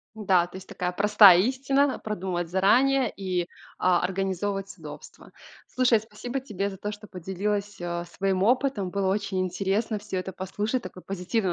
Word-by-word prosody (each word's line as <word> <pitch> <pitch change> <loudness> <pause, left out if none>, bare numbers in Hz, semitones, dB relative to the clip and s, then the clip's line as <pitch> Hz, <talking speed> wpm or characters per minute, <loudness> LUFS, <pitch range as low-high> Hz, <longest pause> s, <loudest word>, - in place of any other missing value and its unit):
Да, 185 -5 +2
то 185 - -12
есть 190 - -11
такая 180 0 -3
простая 200 -2 +7
истина: 270 +4 +1
продумывать 185 -5 -3
заранее 245 +8 +3
и, 185 -3 -2 0.3
а, 180 -1 +3
организовывать 195 +1 -2
удобство. 465 -1 -11 0.3
Слушай, 250 -3 +3
спасибо 225 +4 -6
тебе 200 -5 -3
за 190 - -8
то, 210 +2 -4
что 210 0 -11
поделилась, 200 +3 -3
а, 175 0 -3
своим 190 +1 -1
опытом. 245 -5 +1
Было 195 -1 0
очень 195 -2 -2
интересно 195 +4 -1
всё 190 -2 -4
это 190 +1 -5
послушать. 210 +7 -2
Такой 185 - -9
позитивный 195 +1 -2
195 Hz, 155 wpm, -26 LUFS, 185-220 Hz, 0.3 s, простая